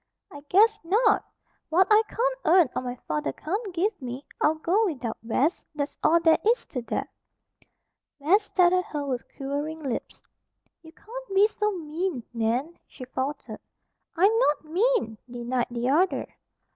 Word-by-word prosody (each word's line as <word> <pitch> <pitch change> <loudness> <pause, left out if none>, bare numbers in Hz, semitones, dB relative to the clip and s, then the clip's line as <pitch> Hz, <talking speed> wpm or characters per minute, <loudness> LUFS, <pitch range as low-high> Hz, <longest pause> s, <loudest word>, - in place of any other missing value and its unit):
"I, 285 - -10
guess, 430 +3 +5
not! 415 +5 +3 0.5
What 360 +4 +4
I 425 +1 +7
can't - - -1
earn, 340 -3 +5
or - - 0
my 250 -1 -4
father 150 -2 -1
can't 395 - -4
give 360 +3 -1
me, 255 +2 -6 0.2
I'll 310 - +3
go 375 +8 +1
without, 255 -9 -3
Bess. 255 +9 0
That's 290 -1 -3
all 335 +2 +4
there 325 -1 +4
is 465 +3 +2
to 250 - -4
that!" 235 - -3 1.1
Bess 345 +9 +4
stared 365 -3 +3
at 365 0 +2
her 295 -2 -4
with 255 -3 -2
quivering 290 +3 -4
lips. 265 -4 -5 0.6
"You 320 - -14
can't 460 +4 -9
be 400 +2 +6
so 425 -1 -1
mean, 325 -4 -3
Nan," 240 +8 -1
she 255 - -10
faltered. 265 +3 -4 0.6
"I'm 390 +6 +4
not 300 -8 +2
mean!" 355 - 0
denied 245 0 -2
the 240 0 -2
other. 355 +7 +2
320 Hz, 160 wpm, -26 LUFS, 260-395 Hz, 1.1 s, I